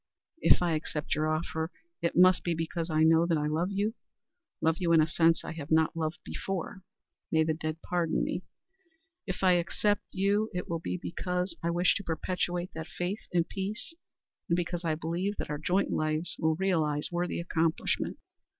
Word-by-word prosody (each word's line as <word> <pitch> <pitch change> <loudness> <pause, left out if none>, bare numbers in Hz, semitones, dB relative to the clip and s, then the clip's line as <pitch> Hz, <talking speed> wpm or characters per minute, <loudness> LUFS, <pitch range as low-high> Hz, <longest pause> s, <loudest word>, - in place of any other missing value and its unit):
If 180 - +5
I 175 - +2
accept 155 -1 -2
your 155 +1 +1
offer, 160 0 -1 0.3
it 170 - 0
must 185 +1 +6
be 170 -1 0
because 165 +1 -3
I 155 0 +3
know 165 +1 +5
that 165 -2 +2
I 150 - 0
love 160 +4 0
you 200 +2 0 0.7
love 160 0 +2
you 170 -2 +2
in 165 - +7
a 155 - +5
sense 165 +1 +3
I - - -5
have 155 -3 -7
not 160 0 +3
loved 155 -1 -2
before 190 0 -4 0.5
may 160 -1 +4
the 160 0 +1
dead 155 0 -4
pardon 175 -2 0
me! - - -2 0.9
If 185 0 -4
I 185 - +6
accept 190 +4 +2
you 200 +3 +1
it 180 - -3
will 165 -1 -2
be 165 - -3
because 180 +1 -2
I 170 - 0
wish 175 +1 +3
to 200 - -6
perpetuate 175 +1 -2
that 160 0 -6
faith 185 +4 -4
and 175 -1 +2
peace, 205 +9 -4 0.6
and 170 - +4
because 175 0 -2
I 160 -2 +1
believe 170 +6 -2
that - - -4
our 150 - -2
joint 180 +5 +1
lives 155 +2 0
will 160 0 +2
realize 155 -5 0
worthy 175 0 -1
accomplishment." 165 -1 0
170 Hz, 185 wpm, -30 LUFS, 160-180 Hz, 0.9 s, in